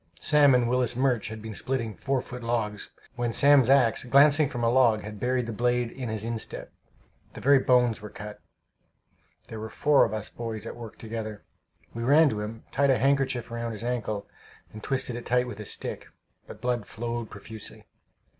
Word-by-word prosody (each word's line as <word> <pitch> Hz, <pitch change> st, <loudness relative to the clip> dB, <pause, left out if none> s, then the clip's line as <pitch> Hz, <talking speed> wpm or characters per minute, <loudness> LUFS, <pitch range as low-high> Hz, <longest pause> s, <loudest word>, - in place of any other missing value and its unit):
Sam 145 Hz, -3 st, +5 dB
and 120 Hz, -1 st, +2 dB
Willis 125 Hz, -1 st, +1 dB
Murch 125 Hz, -3 st, +1 dB
had 110 Hz, 0 st, -8 dB
been 110 Hz, -1 st, -6 dB
splitting 115 Hz, 0 st, -3 dB
four 130 Hz, +7 st, -2 dB
foot 125 Hz, 0 st, -8 dB
logs, 110 Hz, -3 st, -2 dB, 0.3 s
when 120 Hz, -1 st, -1 dB
Sam's 140 Hz, 0 st, +5 dB
axe, 135 Hz, -4 st, +4 dB
glancing 145 Hz, +3 st, +5 dB
from 120 Hz, -1 st, -4 dB
a 115 Hz, -, +3 dB
log, 120 Hz, -4 st, +4 dB
had 105 Hz, 0 st, -8 dB
buried 125 Hz, +1 st, 0 dB
the 115 Hz, -, -5 dB
blade 120 Hz, +1 st, 0 dB
in 125 Hz, -3 st, -6 dB
his 110 Hz, -1 st, -3 dB
instep; 115 Hz, -1 st, -5 dB, 0.6 s
the -, -, -9 dB
very 140 Hz, +1 st, +5 dB
bones 125 Hz, -4 st, +2 dB
were 105 Hz, -, -8 dB
cut. 105 Hz, +1 st, -9 dB, 1.1 s
There 110 Hz, -, -8 dB
were 110 Hz, +1 st, -6 dB
four 145 Hz, +4 st, +3 dB
of 110 Hz, -, 0 dB
us 110 Hz, -1 st, -3 dB
boys 115 Hz, -2 st, -6 dB
at -, -, -6 dB
work 115 Hz, -2 st, -10 dB
together. 110 Hz, -2 st, -6 dB, 0.5 s
We 115 Hz, -, -5 dB
ran 145 Hz, +6 st, +5 dB
to 110 Hz, -, -3 dB
him, 110 Hz, +2 st, -7 dB
tied 140 Hz, +1 st, +2 dB
a 130 Hz, -, +4 dB
handkerchief 135 Hz, -2 st, 0 dB
round 115 Hz, -1 st, -4 dB
his 110 Hz, -, -7 dB
ankle, 110 Hz, -4 st, -3 dB, 0.5 s
and 110 Hz, -, -9 dB
twisted 130 Hz, 0 st, -2 dB
it 120 Hz, -, -7 dB
tight 125 Hz, +1 st, +2 dB
with 120 Hz, -, -8 dB
a 105 Hz, -, -6 dB
stick; -, -, -3 dB, 0.4 s
but -, -, -11 dB
blood 120 Hz, -3 st, -1 dB
flowed 120 Hz, 0 st, -5 dB
profusely. 110 Hz, +1 st, -11 dB
120 Hz, 190 wpm, -27 LUFS, 110-130 Hz, 1.1 s, Sam